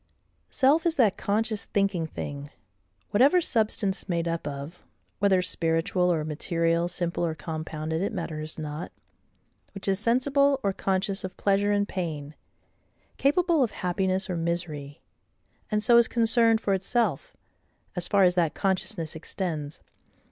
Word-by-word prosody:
SELF 295 Hz, +5 st, +3 dB
is 330 Hz, -, +1 dB
that 220 Hz, -, +3 dB
conscious 215 Hz, +1 st, -1 dB
thinking 195 Hz, -5 st, 0 dB
thing,—whatever 140 Hz, -, -1 dB
substance 215 Hz, -, -1 dB
made 170 Hz, -1 st, 0 dB
up 165 Hz, -2 st, -2 dB
of, 145 Hz, +4 st, -7 dB, 0.4 s
(whether 195 Hz, -2 st, +3 dB
spiritual 170 Hz, +1 st, +1 dB
or 155 Hz, -3 st, 0 dB
material, 165 Hz, +2 st, 0 dB
simple 175 Hz, -1 st, -2 dB
or 165 Hz, -2 st, -1 dB
compounded, 160 Hz, 0 st, -4 dB
it 200 Hz, -, -1 dB
matters 155 Hz, -1 st, -4 dB
not)—which 155 Hz, +5 st, -10 dB
is 195 Hz, 0 st, +2 dB
sensible 275 Hz, +4 st, +2 dB
or 195 Hz, -, +1 dB
conscious 190 Hz, +1 st, -1 dB
of 185 Hz, -1 st, -6 dB
pleasure 200 Hz, +1 st, +2 dB
and 205 Hz, 0 st, +1 dB
pain, 155 Hz, -7 st, -4 dB, 0.8 s
capable 330 Hz, +2 st, +3 dB
of 245 Hz, -, +3 dB
happiness 185 Hz, 0 st, -1 dB
or 180 Hz, -, -2 dB
misery, 165 Hz, -4 st, -3 dB, 0.7 s
and 210 Hz, -1 st, 0 dB
so 235 Hz, +2 st, +6 dB
is 235 Hz, -1 st, +6 dB
concerned 230 Hz, -1 st, +3 dB
for 200 Hz, -, +1 dB
itself, 240 Hz, -, -1 dB, 0.6 s
as 180 Hz, -, -3 dB
far 200 Hz, -1 st, +4 dB
as 180 Hz, -1 st, +5 dB
that 170 Hz, -3 st, +1 dB
consciousness 190 Hz, -4 st, -1 dB
extends. 160 Hz, -3 st, -4 dB
185 Hz, 135 wpm, -27 LUFS, 165-215 Hz, 0.8 s, so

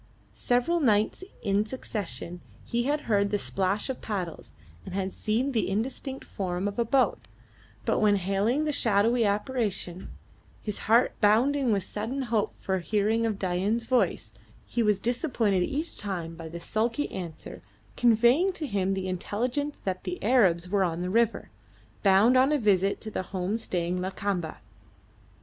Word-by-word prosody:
Several 250 Hz, +8 st, +1 dB
nights 220 Hz, -, +2 dB, 0.2 s
in 200 Hz, +1 st, +2 dB
succession 185 Hz, -, -5 dB, 0.2 s
he 240 Hz, 0 st, -1 dB
had 295 Hz, +2 st, +1 dB
heard 200 Hz, -6 st, +1 dB
the 205 Hz, -, +1 dB
splash 195 Hz, +1 st, -1 dB
of 265 Hz, -2 st, -4 dB
paddles 180 Hz, -, -5 dB, 0.3 s
and 180 Hz, -, -7 dB
had 190 Hz, -1 st, -2 dB
seen 235 Hz, +6 st, 0 dB
the 225 Hz, -6 st, 0 dB
indistinct 260 Hz, +6 st, -3 dB
form 185 Hz, 0 st, -3 dB
of 205 Hz, +3 st, -4 dB
a -, -, +4 dB
boat, 260 Hz, +3 st, +1 dB, 0.6 s
but -, -, +2 dB
when 210 Hz, -1 st, +4 dB
hailing 200 Hz, +9 st, +1 dB
the 300 Hz, -, +1 dB
shadowy 230 Hz, -2 st, +2 dB
apparition, 205 Hz, -5 st, -2 dB, 0.5 s
his 210 Hz, -2 st, -5 dB
heart 235 Hz, +3 st, +5 dB
bounding 245 Hz, +5 st, +3 dB
with 200 Hz, -3 st, +1 dB
sudden 225 Hz, +9 st, -3 dB
hope 230 Hz, -4 st, 0 dB
of 190 Hz, -1 st, +1 dB
hearing 220 Hz, +4 st, +1 dB
Dain's 195 Hz, +5 st, 0 dB
voice, 250 Hz, +2 st, 0 dB, 0.3 s
he 240 Hz, -, -1 dB
was 210 Hz, -3 st, +2 dB
disappointed 230 Hz, -, +1 dB
each 300 Hz, -, -2 dB
time 180 Hz, -5 st, -4 dB
by 165 Hz, -1 st, -8 dB
the 170 Hz, +1 st, -7 dB
sulky 230 Hz, +10 st, -1 dB
answer 170 Hz, -, -7 dB, 0.3 s
conveying 240 Hz, -, +4 dB
to 325 Hz, -, -4 dB
him 195 Hz, -6 st, 0 dB
the 190 Hz, -1 st, -3 dB
intelligence 245 Hz, +10 st, -2 dB
that 185 Hz, -1 st, -3 dB
the 180 Hz, -1 st, -3 dB
Arabs 190 Hz, -7 st, +3 dB
were 195 Hz, +1 st, +2 dB
on 175 Hz, -1 st, -1 dB
the 180 Hz, -, -2 dB
river, 230 Hz, -, +1 dB, 0.5 s
bound 200 Hz, +6 st, +5 dB
on 260 Hz, +3 st, +5 dB
a 300 Hz, -, +3 dB
visit 200 Hz, -5 st, +2 dB
to 215 Hz, -, -6 dB
the -, -, -2 dB, 0.2 s
home 185 Hz, +4 st, -1 dB
staying 180 Hz, -5 st, -1 dB
Lakamba. 190 Hz, -3 st, -3 dB
210 Hz, 155 wpm, -27 LUFS, 190-240 Hz, 0.6 s, heart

